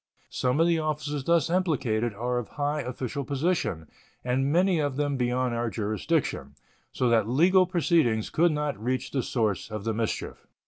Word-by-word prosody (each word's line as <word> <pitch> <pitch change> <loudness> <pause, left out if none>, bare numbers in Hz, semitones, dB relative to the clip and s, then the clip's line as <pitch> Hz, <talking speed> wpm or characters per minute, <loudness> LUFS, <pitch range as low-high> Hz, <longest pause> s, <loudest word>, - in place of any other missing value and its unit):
Some 125 +3 0
of 165 - +5
the 170 -1 +2
officers 150 -2 -3
thus 170 -3 +3
implicated 125 - 0
are 120 +3 -1
of 120 - -6
high 145 +1 0
official 130 +2 -4
position, 140 - -1 0.4
and 130 +3 +1
many 180 +1 +3
of 145 -3 -1
them 145 0 0
beyond 125 0 0
our 115 0 -1
jurisdiction, 110 - -2 0.4
so 125 - 0
that 115 -2 +2
legal 180 +8 +4
proceedings 165 - +1
could 170 +1 +3
not 150 -7 -2
reach 130 +2 -2
the 135 - 0
source 110 -5 -1
of 105 -2 -5
the 110 0 -1
mischief. 110 0 -4
130 Hz, 170 wpm, -27 LUFS, 115-155 Hz, 0.4 s, of